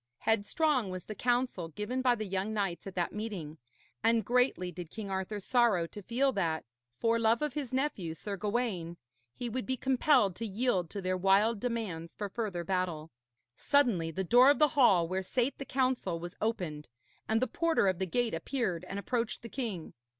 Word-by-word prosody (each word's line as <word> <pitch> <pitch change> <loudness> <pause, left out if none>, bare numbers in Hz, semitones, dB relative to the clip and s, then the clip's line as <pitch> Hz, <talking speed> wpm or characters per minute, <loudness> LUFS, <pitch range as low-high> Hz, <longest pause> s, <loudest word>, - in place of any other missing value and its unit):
Headstrong 225 +3 +1
was 185 -1 -5
the 215 - -5
counsel 245 -6 0
given 210 - -3
by 250 -1 +4
the 215 -2 -4
young 195 +3 -2
knights 195 -3 -2
at 195 - -7
that 175 -2 -1
meeting, 190 -8 -5 0.4
and 225 -2 +3
greatly 245 -7 +2
did 175 -1 -8
King 205 -1 -6
Arthur 190 +2 -2
sorrow 220 -5 +3
to 205 +5 -9
feel 255 +7 +1
that, 165 -8 -1 0.3
for 230 0 +2
love 230 +3 +3
of 300 -3 -1
his 280 -4 -4
nephew, 255 - -1
Sir 205 +3 -5
Gawaine, 200 -5 -2 0.4
he 245 - -4
would 240 -1 -3
be 260 - 0
compelled 260 - +3
to 230 - -3
yield 200 -5 0
to 200 +1 -5
their 185 0 0
wild 200 +4 +3
demands 205 -9 -3
for 205 -1 -4
further 195 -5 -3
battle. 170 -3 -2 0.4
Suddenly 240 - +2
the 190 +4 -2
door 245 +8 +6
of 285 - +5
the 300 -1 +5
hall 200 -12 +4
where 185 +2 -1
sate 250 +7 -1
the 275 - -5
council 255 -11 0
was 175 +1 -7
opened, 175 -9 -2 0.4
and 220 0 +3
the 255 - +2
porter 330 -7 +1
of 185 -2 +1
the 190 - -1
gate 240 +5 0
appeared 180 -1 -2
and 195 +2 -5
approached 230 +5 -2
the 230 - -7
king. 220 -11 -4
210 Hz, 190 wpm, -31 LUFS, 185-245 Hz, 0.4 s, door